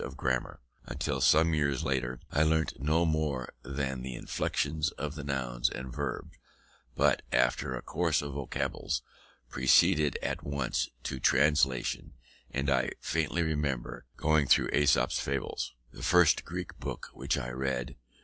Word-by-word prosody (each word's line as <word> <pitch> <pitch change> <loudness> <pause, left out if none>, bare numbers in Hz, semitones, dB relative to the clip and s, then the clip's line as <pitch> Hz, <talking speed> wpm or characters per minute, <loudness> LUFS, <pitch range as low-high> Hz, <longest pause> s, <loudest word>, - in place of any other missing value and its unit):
Of - - -7
grammar, 65 -1 -1 0.3
until - - -2
some 80 +2 +5
years 70 -4 +1
later, 65 -2 -1
I 75 - +2
learnt 80 -2 +1
no 80 +4 +2
more 75 -5 -1
than 65 -2 -3
the 65 -1 -5
inflections 75 +5 -1
of 75 0 -4
the 75 -2 -7
nouns 65 -4 -1
and 65 -1 -7
verbs, 70 -4 -4 0.6
but, - - +3
after 60 0 +2
a - - -6
course - - 0
of 70 -1 -5
vocables, 70 -1 -2 0.4
proceeded 75 +4 +4
at - - -2
once 70 -3 -1
to 65 - -4
translation; 65 -3 +2 0.4
and 70 +1 -2
I 65 -1 +1
faintly 80 +2 0
remember 65 -6 -2
going 80 -2 +2
through - - +4
Aesop's 70 -1 +3
Fables, 70 -2 -3 0.2
the - - -11
first 90 -3 +4
Greek 90 0 -6
book - - -6
which - - -1
I 60 - -4
read. 65 -1 -2
70 Hz, 145 wpm, -30 LUFS, 65-75 Hz, 0.6 s, some